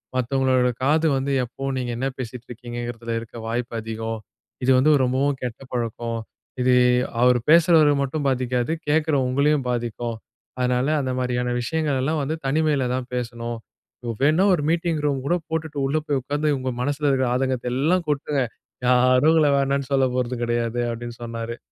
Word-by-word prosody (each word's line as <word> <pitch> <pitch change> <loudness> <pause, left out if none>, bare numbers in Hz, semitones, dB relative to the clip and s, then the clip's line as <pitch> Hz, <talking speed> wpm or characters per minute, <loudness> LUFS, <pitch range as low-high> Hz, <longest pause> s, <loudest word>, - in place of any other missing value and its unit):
மத்தவங்களோட 130 0 +2
காது 155 +4 +3
வந்து 135 +1 -1
எப்பவும் 135 +3 -4
நீங்க 125 -1 -3
என்ன 130 +3 -1
பேசிட்டுருக்கீங்கங்கிறதில 120 -1 -6
இருக்க 115 +1 -11
வாய்ப்பு 120 0 -3
அதிகம். 115 0 -4 0.4
இது 130 - +4
வந்து 140 +4 +4
ரொம்பவும் 135 +3 +1
கெட்ட 125 0 -5
பழக்கம். 115 -1 -2 0.4
இது 125 0 +4 0.5
அவரு 125 0 +5
பேசுறவர 165 -2 +6
மட்டும் 145 +2 -3
பாதிக்காது. 125 0 0 0.2
கேக்கிற 155 0 +2
உங்களையும் 140 +2 +2
பாதிக்கும். 120 -1 -2 0.4
அதனால 125 +1 +1
அந்தமாரியான 125 -2 -1
விஷயங்கள் 150 +1 -1
எல்லாம் 155 +3 0
வந்து 155 +3 -2
தனிமையில 145 -2 +1
தான் 130 -1 -4
பேசணும். 120 -1 -4 0.6
வேணா 155 +6 +4
ஒரு 160 -5 0
மீட்டிங் 165 -2 0
ரூம் 140 -3 0
கூட 175 - +3
போட்டுட்டு, 160 -2 -3
உள்ள 145 +3 0
போய் 145 -2 +1
உக்கார்ந்து 145 +3 0
உங்க 130 0 -2
மனசுல 145 +2 -1
இருக்கிற 130 -2 +2
ஆதங்கத்த 130 -1 -1
எல்லாம் 165 +6 +1
கொட்டுங்க. 145 -1 0 0.4
யாரும் 125 +4 +5
உங்கள 155 -3 +4
வேணான்னு 140 0 0
சொல்ல 135 -1 +4
போறது 125 0 -1
கெடையாது" 120 0 -1
அப்பிடின்னு 120 0 -6
சொன்னாரு. 115 0 -5
130 Hz, 150 wpm, -23 LUFS, 120-145 Hz, 0.6 s, பேசுறவர